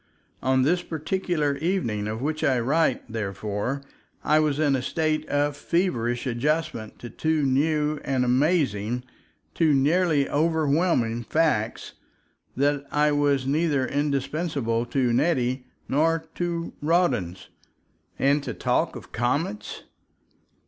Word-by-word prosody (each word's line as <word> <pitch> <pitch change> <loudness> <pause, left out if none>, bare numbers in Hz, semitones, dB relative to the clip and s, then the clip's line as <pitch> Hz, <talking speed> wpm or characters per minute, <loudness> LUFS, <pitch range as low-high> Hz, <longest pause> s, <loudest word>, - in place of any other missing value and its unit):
On 130 0 +2
this 175 +6 +2
particular 160 -3 -1
evening 140 - -1
of 110 +3 -4
which 155 +1 -2
I 130 -3 +3
write, 135 +3 +1
therefore, 105 +4 -3 0.4
I 155 +1 +4
was 150 -2 +1
in 145 -3 +2
a 130 - -1
state 155 +2 -1
of 145 0 +1
feverish 120 -10 -1
adjustment 130 -2 -1
to 120 - -8
two 160 -1 0
new 150 +2 +1
and 130 -2 0
amazing, 125 - +1 0.5
two 155 -4 +3
nearly 150 +1 +2
overwhelming 150 -6 +1
facts, 120 -5 0 0.6
that 145 +1 +1
I 150 0 +3
was 145 -2 +2
neither 145 -1 +1
indispensable 140 -4 -1
to 125 -1 +1
Nettie 130 -3 +1 0.2
nor 160 +4 +2 0.2
at 175 - -1 0.4
Rawdon's. 150 - 0 0.7
And 140 +2 +2
to - - -5
talk - - 0
of - - -10
comets! 145 - -2
145 Hz, 120 wpm, -25 LUFS, 125-155 Hz, 0.7 s, I